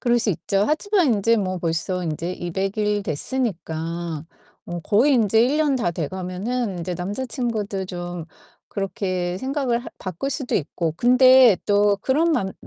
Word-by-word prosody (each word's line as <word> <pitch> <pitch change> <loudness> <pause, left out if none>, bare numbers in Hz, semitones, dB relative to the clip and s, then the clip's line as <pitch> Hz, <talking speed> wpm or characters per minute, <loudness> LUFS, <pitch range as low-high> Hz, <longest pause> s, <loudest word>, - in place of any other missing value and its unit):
그럴 240 -1 +3
수 220 -2 +1
있죠. 195 +3 0
하지만 320 - +2
인제 230 +3 +2
뭐 185 -3 -1
벌써 175 +2 -2
인제 170 +2 -3
200 190 +4 -3
일 210 -1 +1
됐으니까 165 - -3 0.4
어 175 0 -5
거의 230 - +3
인제 220 -1 +3
1 280 +5 +1
년 295 -4 +2
다 215 -8 0
돼가면은 185 - -3
이제 180 +1 -3
남자친구도 210 0 -3
좀 175 -2 -6 0.5
그렇게 185 -2 -2
생각을 260 -1 -1
할 - - -9
바꿀 185 +9 -4
수도 270 -3 -3
있고 160 0 -1
근데 250 -1 +6
또 205 0 +3
그런 310 +6 +2
맘 190 -9 0
200 Hz, 275 characters per minute, -23 LUFS, 175-245 Hz, 0.5 s, 근데